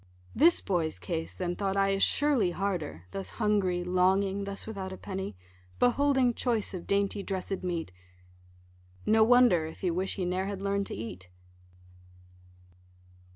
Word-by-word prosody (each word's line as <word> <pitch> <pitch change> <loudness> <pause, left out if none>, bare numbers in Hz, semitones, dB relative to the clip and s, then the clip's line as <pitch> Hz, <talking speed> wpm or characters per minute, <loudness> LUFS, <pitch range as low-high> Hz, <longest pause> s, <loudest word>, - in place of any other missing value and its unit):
This 335 +4 +5
boy's 165 - -1
case, 85 -1 -4
then 175 - -3
thought 195 0 -1
I, 195 0 +3
is 195 0 0
surely 275 -9 +3
harder, 175 - -3
Thus 195 - -5
hungry, 200 -5 +1
longing, 190 +2 +2
thus 200 0 -4
without 195 -4 -5
a 190 - -7
penny, 190 - -5 0.4
Beholding 260 0 +3
choice 230 -5 -1
of 180 -2 -7
dainty 200 0 0
dressed 195 -1 -4
meat: 170 - -3 1.1
No 220 0 +5
wonder 230 -9 +5
if 160 - -11
he 180 - +1
wish 185 +3 -1
he 185 - -2
ne'er 185 +2 -1
had 200 -1 -4
learn'd 200 0 -1
to - - -5
eat. 95 -4 -7
195 Hz, 150 wpm, -29 LUFS, 175-205 Hz, 1.1 s, This